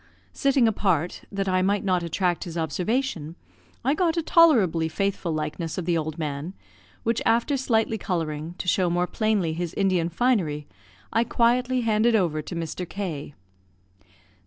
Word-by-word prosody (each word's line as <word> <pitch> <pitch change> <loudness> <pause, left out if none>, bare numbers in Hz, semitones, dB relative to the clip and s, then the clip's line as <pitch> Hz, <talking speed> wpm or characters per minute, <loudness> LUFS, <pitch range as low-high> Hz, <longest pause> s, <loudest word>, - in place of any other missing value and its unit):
Sitting 275 -3 +3
apart, 180 -6 0
that 195 -1 -2
I 185 0 +2
might 200 +2 +1
not 185 -3 +1
attract 175 +2 -1
his 170 -1 -6
observation, 170 - -2 0.5
I 275 - +3
got 340 +1 +1
a 335 - +1
tolerably 210 - +4
faithful 195 0 -1
likeness 155 +1 -3
of 180 - -3
the 175 -1 +1
old 155 -1 -2
man, 150 +3 -4 0.5
which 230 0 0
after 235 +5 +2
slightly 225 -4 +1
colouring, 165 -2 -3
to - - -6
show 180 0 +2
more 175 +1 +1
plainly 205 -5 0
his 170 0 -4
Indian 185 -4 +1
finery, 170 -8 0 0.5
I 230 - +3
quietly 245 +2 +2
handed 225 +1 +3
over 165 -7 +1
to 170 - -7
Mr. 170 +1 -4
K 165 -8 -5
185 Hz, 155 wpm, -25 LUFS, 165-225 Hz, 0.5 s, tolerably